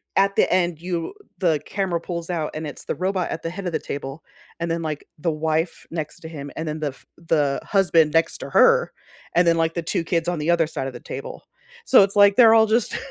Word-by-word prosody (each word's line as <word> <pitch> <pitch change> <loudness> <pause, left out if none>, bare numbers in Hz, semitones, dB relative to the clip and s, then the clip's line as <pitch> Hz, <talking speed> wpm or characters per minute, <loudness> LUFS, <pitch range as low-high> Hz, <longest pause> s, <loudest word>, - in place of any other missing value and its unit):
at 195 0 +3
the - - +2
end 175 -3 +1
you 175 - -3 0.2
the 160 -6 +1
camera 185 -4 -2
pulls 170 -1 -5
out 160 -4 -2
and 155 0 -5
it's 145 - -9
the - - -3
robot 185 -1 -1
at 165 - -4
the 165 - -2
head 185 +2 -7
of 175 - -2
the - - -1
table, 140 +2 -6 0.4
and 170 0 -2
then 165 0 -1
like 155 -2 -4
the 165 +2 -1
wife 160 +2 -2
next 155 -3 -5
to 160 - -8
him, 145 -3 -8
and 160 - -4
then 155 0 -3
the 150 - 0
f 135 - -9
the 150 -4 0
husband 170 -6 +3
next 165 0 +1
to - - -7
her, 480 0 +4 0.4
and 175 0 +4
then, 165 - +5
like, 165 0 +1
the 170 - -1
2 165 - -1
kids 165 0 -1
on 175 -3 -1
the 150 - -2
other 170 -2 +2
side 135 -4 -4
of 130 - -6
the 120 - -8
table. 135 +3 -8 0.4
So 255 - +7
it's 195 +1 -2
like 200 -1 +6
they're 225 -1 +7
all 220 -1 +6
just 220 +1 0
165 Hz, 245 wpm, -22 LUFS, 155-185 Hz, 0.4 s, So